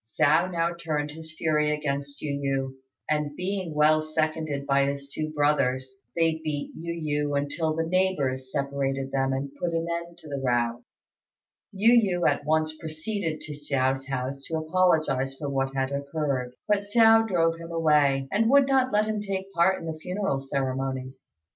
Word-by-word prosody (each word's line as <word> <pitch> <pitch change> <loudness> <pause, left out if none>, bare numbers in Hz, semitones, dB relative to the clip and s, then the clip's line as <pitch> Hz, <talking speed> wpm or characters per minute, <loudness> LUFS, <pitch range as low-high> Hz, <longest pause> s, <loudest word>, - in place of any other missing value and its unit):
Hsiao 150 +10 +3
now 170 -1 0
turned 155 -3 -3
his 160 +1 -8
fury 150 -1 +2
against 140 -1 -3
Yu 140 -2 -2
yü, 135 -1 -1 0.3
and 150 -1 -1
being 185 -2 -3
well 155 +1 +4
seconded 155 -2 -2
by 140 0 +3
his 140 0 -4
two 155 +2 -4
brothers, 130 -3 0 0.2
they 165 -1 +1
beat 150 -2 -3
Yu 155 -3 -2
yü 145 - 0
until 155 +3 -1
the 165 0 0
neighbours 150 -8 0
separated 135 -1 -2
them 135 0 +1
and 135 +1 -3
put 170 +1 -2
an 165 0 0
end 170 0 -7
to 160 - -12
the 140 -2 -4
row. 120 -1 0 0.9
Yu 215 +4 +4 0.3
yü 175 - +3
at - - +1
once 155 0 +1
proceeded 160 +1 -4
to 150 - -6
Hsiao's 135 -2 -1
house 135 0 -3
to 160 - -2
apologize 155 -5 +1
for 145 - -4
what 135 0 -1
had 135 0 0
occurred; 140 -3 -2
but 205 -1 +2
Hsiao 225 +1 +6
drove 165 -4 +2
him 165 0 -8
away, 150 -5 +3
and 225 +3 +2
would 280 0 +6
not 260 -1 +3
let 210 +1 +3
him 215 -1 -2
take 195 -1 -4
part 180 +2 +3
in - - -8
the 160 -1 -5
funeral 180 -4 -2
ceremonies. 135 -1 -3
150 Hz, 175 wpm, -26 LUFS, 135-170 Hz, 0.9 s, Hsiao